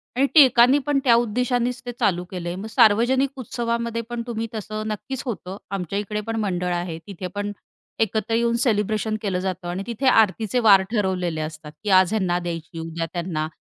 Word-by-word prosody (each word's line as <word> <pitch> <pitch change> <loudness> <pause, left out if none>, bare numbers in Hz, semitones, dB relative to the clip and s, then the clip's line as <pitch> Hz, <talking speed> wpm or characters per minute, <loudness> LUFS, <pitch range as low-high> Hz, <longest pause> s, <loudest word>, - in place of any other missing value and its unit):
आणि 265 +2 +3
टिळकांनी 260 -2 +7
पण 290 -1 +2
त्या 240 -4 +5
उद्देशानेच 245 +1 0
ते 245 - -3
चालू 180 -6 +1
केलंय. 175 -2 -4
मग 195 +3 -6
सार्वजनिक 240 +4 +4
उत्सवामध्ये 235 -1 -2
पण 240 -1 -3
तुम्ही 230 -1 -3
तसं 215 0 -4
नक्कीच 235 +5 -4
होतं. 195 -5 -5
आमच्या 195 0 -2
इकडे 210 +1 -3
पण 225 - -2
मंडळ 180 -3 -1
आहे. 175 -2 -3
तिथे 190 -2 -6
पण 205 0 -2 0.5
एकत्र 220 0 0
येऊन 235 0 +2
सेलिब्रेशन 215 -1 0
केलं 195 -4 -1
जातं 185 -1 -4
आणि 180 +3 -3
तिथे 240 +3 -3
आरतीचे 220 -1 +3
वार 205 -5 +7
ठरवलेले 185 -7 -1
असतात, 155 -1 -7
की 210 - -2
आज 185 +1 +5
ह्यांना 185 -5 +1
द्यायची 165 -1 -6
उद्या 165 0 -4
त्यांना. 170 -3 -2
210 Hz, 175 wpm, -23 LUFS, 180-235 Hz, 0.5 s, टिळकांनी